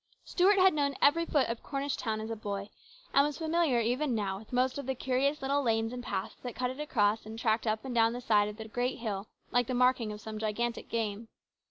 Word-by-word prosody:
TUART 390 +3 +5
had 375 -2 +6
known 285 -2 0
every 330 +4 +4
foot 285 -4 +2
of 230 0 -4
Cornish 280 -1 -2
town 220 -1 -2
as 220 +1 -5
a - - -2
boy, 200 -1 -5 0.4
and 275 - +6
was 295 -1 -2
familiar 320 -5 +2
even 250 +3 0
now 195 -3 -2
with 215 - -15
most 255 +2 +1
of 280 - -6
the 265 - -1
curious 270 +3 0
little 280 +2 +1
lanes 225 -2 0
and 250 - -5
paths 195 -4 -4
that 245 -2 -6
cut 250 0 -1
it 260 - -9
across 220 -7 +1
and 220 +1 -8
tracked 225 0 +1
up 220 +3 -1
and 260 - -4
down 230 -1 +4
the 245 - -4
side 210 -4 +3
of 210 0 -7
the 220 -1 -7
great 245 +3 -1
hill 210 -3 -4 0.2
like 245 -1 +2
the 255 - -1
marking 250 -3 +3
of 210 - -7
some 215 0 -7
gigantic 230 +2 -2
game. 225 -1 -2
240 Hz, 240 wpm, -31 LUFS, 220-275 Hz, 0.4 s, had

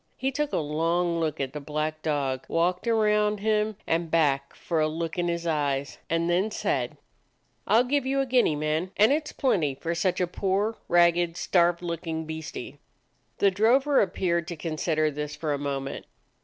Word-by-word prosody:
He 265 +1 -1
took 295 +2 -2
a - - 0
long 165 +3 0
look 155 -3 -1
at 135 -1 -3
the 150 - -4
black 155 +2 -3
dog, 140 -4 -1
walked 180 +5 0
around 210 -2 +2
him 215 0 +1
and 165 0 0
back 140 -4 +1
for 165 -2 -2
a 155 - +3
look 160 +1 -3
in 175 - +1
his 170 0 -2
eyes, 145 -4 -1
and 165 +1 +1
then 180 +5 +2
said: 215 - -2 0.3
" - - -43
I 220 - +5
'll 240 - +5
give 270 +1 0
you 275 +1 +1
a 270 - +2
guinea, 245 - +3
man, 155 +4 -1
and 215 +4 +5
it 305 +1 +1
's - - -7
plenty 165 - +1
for 165 +5 -3
such 175 +2 0
a 180 - +2
poor, 195 +4 -1
ragged, 170 0 +3
starved 175 -1 +2
look 170 -1 -4
ing 160 0 -3
beastie." 160 0 -7 0.6
The 200 - +4
drover 260 +8 +3
appeared 170 -3 0
to 175 - -4
consider 155 -1 -1
this 150 0 -5
for 155 -3 -2
a 140 - -2
moment. 140 -1 -4
170 Hz, 195 wpm, -26 LUFS, 155-205 Hz, 0.6 s, I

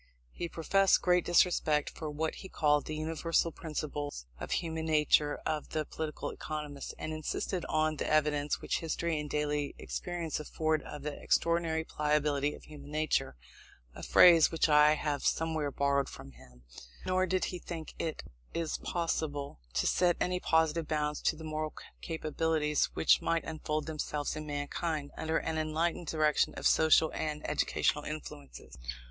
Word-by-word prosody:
He 170 - -5
professed 195 +4 +3
great 180 -1 +4
disrespect 160 -4 +3
for 155 - -6
what 155 +2 -2
he 190 - -9
called 150 -4 +2
"the 155 - -3
universal 165 +2 0
principles 145 - -5
of - - -6
human 160 -1 -2
nature 150 -1 +3
of 155 -1 -2
the 155 -1 0
political 155 0 -4
economists," 150 -2 -6
and 155 - -4
insisted 155 +3 -3
on 155 0 +1
the - - -2
evidence 150 -1 +1
which - - -1
history 165 0 -1
and 150 0 -5
daily 150 -1 -1
experience 175 -3 -4
afford 155 +1 0
of 145 -1 -8
the 150 -1 -5
"extraordinary 170 -1 +1
pliability 150 -2 0
of - - -15
human 145 -2 -11
nature" 155 - 0 0.6
(a - - -10
phrase 170 -3 +7
which 165 - +2
I 150 0 +6
have 150 -2 -2
somewhere 160 -2 0
borrowed 140 0 +1
from 70 0 -10
him); 60 -1 -18 0.4
nor 185 0 +2
did 185 +1 +1
he 180 - -4
think 165 -2 -7
it 160 - -3 0.6
possible 145 - -2
to - - +1
set 175 -2 +3
any 180 0 0
positive 160 -1 +2
bounds 150 -1 -1
to - - +2
the 160 - -10
moral 155 0 -3 0.3
capabilities 155 -2 0
which - - +4
might 165 0 0
unfold 155 -1 -3
themselves 150 -2 -3
in 155 0 -6
mankind, 145 +1 -3
under 160 +1 -1
an 160 - -2
enlightened 160 +2 -1
direction 155 -1 +2
of - - -6
social 160 0 +5
and 150 -1 -3
educational 150 0 +1
influences. 70 - -8
155 Hz, 155 wpm, -31 LUFS, 150-160 Hz, 0.6 s, phrase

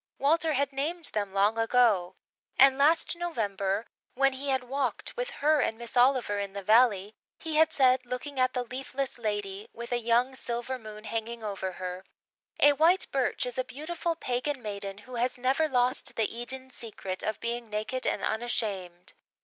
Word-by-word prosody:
Walter 315 +3 +2
had 280 0 0
named 315 +4 -2
them 205 -2 -1
long 205 +3 +2
ago; 225 -6 +3 0.4
and 270 0 +7
last 305 +5 +3
November, 210 - -1 0.3
when 275 +1 +3
he 275 +2 -4
had 265 -1 +1
walked 265 +1 -2
with - - -2 0.2
her 305 0 +5
and 225 -4 0
Miss 235 +1 -8
Oliver 245 -5 +3
in 200 -1 -4
the 200 -1 -5
Valley, 215 -2 +4 0.2
he 320 -1 -3
had 320 0 +5
said, 260 -3 +4
looking 250 +3 -5
at 255 0 +2
the 250 - 0
leafless 265 +1 -4
Lady, 205 -2 -3
with 235 +1 -8
a 245 - +1
young 240 +3 +2
silver 245 0 -3
moon 215 -1 -10
hanging 225 +1 -4
over 195 -3 -3
her, 180 +1 -6 0.6
"A 290 - +7
white 335 +6 +4
birch 265 -2 0
is 250 0 -4
a - - +2
beautiful 330 +5 -3
Pagan 255 -1 -2
maiden 200 -2 -5
who 255 -1 -7
has 250 +2 0
never 265 +6 +2
lost 250 -1 +1
the 225 0 0
Eden 260 +2 -7
secret 200 -6 -6
of 215 - -2
being 235 -1 -3
naked 215 +5 -2
and - - -1
unashamed." 200 -6 -2
245 Hz, 175 wpm, -29 LUFS, 215-270 Hz, 0.6 s, and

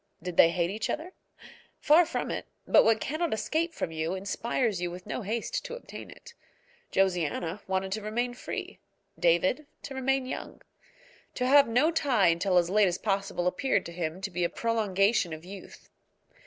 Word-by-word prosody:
Did 180 -1 -5
they 165 - +7
hate 170 +1 0
each 215 +2 -3
other? 335 +5 -4 0.7
Far 315 +3 +5
from - - -3
it; - - -4 0.2
but - - +6
what 225 -1 +3
cannot 310 0 -1
escape 315 +10 -1
from 165 - -4
you 160 +3 -2
inspires 200 +1 -1
you 175 - -1
with 180 +1 -9
no 215 - -4
haste 220 +3 -3
to - - -5
obtain - - -10
it. 485 - -13 0.6
Josiana 180 0 0
wanted 190 0 -1
to 215 +2 -2
remain 240 +4 -2
free, 245 - -6 0.4
David 185 - +2 0.2
to 275 - -6
remain 265 0 0
young. 255 - -7 0.7
To 250 - -1
have 280 +2 +6
no 250 +8 +3
tie 250 - +3
until 180 +2 +2
as 175 0 +2
late 210 0 +5
as 175 -1 -1
possible 195 -3 -1
appeared 265 +9 +1
to 170 - -7
him 170 +1 -4
to 195 0 -4
be 175 0 -1
a 170 - +2
prolongation 205 -5 +1
of 160 +2 -9
youth. 195 +1 -11
200 Hz, 180 wpm, -28 LUFS, 180-255 Hz, 0.7 s, they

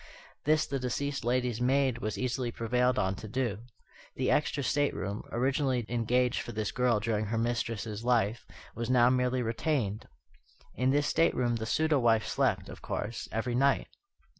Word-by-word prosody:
This 155 +1 +3
the 135 0 -3
deceased 135 +2 -2
lady's 125 -1 0
maid 130 -1 +2
was 110 -2 -3
easily 130 -1 -1
prevailed 125 +2 +1
on 95 -2 +1
to 110 - -8
do. 115 -3 -2 0.6
The - - 0
extra 150 -1 +1
stateroom, 130 -7 -1
originally 130 0 0
engaged 120 +1 +1
for - - -7
this 110 -1 -2
girl 125 -3 +2
during 110 0 -1
her 110 +2 -2
mistress's 115 -2 -2
life, 120 -2 +1 0.3
was 115 0 -4
now 125 -1 +5
merely 125 0 +1
retained. 115 -3 -1 0.7
In 130 +1 +1
this 145 +2 +2
stateroom 125 -9 +2
the 110 0 -4
pseudo 155 +5 +2
wife 115 -3 +3
slept, - - 0
of - - -10
course, 110 +2 -4
every 115 +2 -2
night. 135 +3 +2
120 Hz, 160 wpm, -30 LUFS, 115-130 Hz, 0.7 s, now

